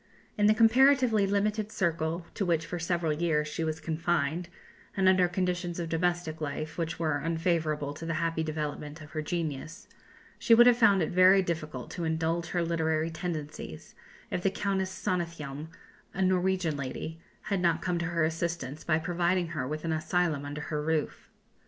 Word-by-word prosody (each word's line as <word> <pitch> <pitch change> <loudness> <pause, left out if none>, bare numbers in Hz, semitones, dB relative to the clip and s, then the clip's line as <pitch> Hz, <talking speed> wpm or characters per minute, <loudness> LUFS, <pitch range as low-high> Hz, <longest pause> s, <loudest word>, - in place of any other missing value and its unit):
In 205 0 +3
the 215 - +5
comparatively 235 -2 +5
limited 210 +2 0
circle 165 -2 -1
to - - -2
which 170 -3 +1
for 175 - -4
several 170 -2 0
years 150 -1 0
she 155 +2 -3
was 160 0 -2
confined, 165 +1 -1 0.5
and 190 -1 +3
under 185 -1 +5
conditions 175 -1 -2
of 170 -1 -3
domestic 165 -1 -1
life 155 +2 -4
which 165 -1 -3
were 155 -3 0
unfavourable 160 -2 0
to 165 +3 -7
the 165 - -1
happy 165 0 0
development 150 -1 -4
of 150 -1 -12
her 155 - -2
genius, 160 +3 -4 0.5
she 230 - +6
would 240 +1 +8
have 245 -1 +7
found 200 -6 +5
it - - -2
very 185 +2 +6
difficult 155 -7 -4
to 175 - -4
indulge 165 +1 0
her 175 0 0
literary 160 -1 0
tendencies, 155 - -6 0.4
if - - -1
the 195 - +2
Countess 195 -1 -1
Sonnethjelm, 165 -6 -3 0.5
a 190 - -1
Norwegian 185 -3 +1
lady, 140 +4 -5 0.2
had 200 -3 -1
not 170 -1 +2
come 180 -2 0
to 175 - -1
her 165 -1 0
assistance 160 -3 -3
by 155 -2 +2
providing 175 +1 0
her 150 -6 -3
with 155 +3 -4
an 165 - 0
asylum 160 -2 0
under 145 +1 -5
her 150 0 -3
roof. 155 -1 -2
165 Hz, 175 wpm, -29 LUFS, 155-180 Hz, 0.5 s, would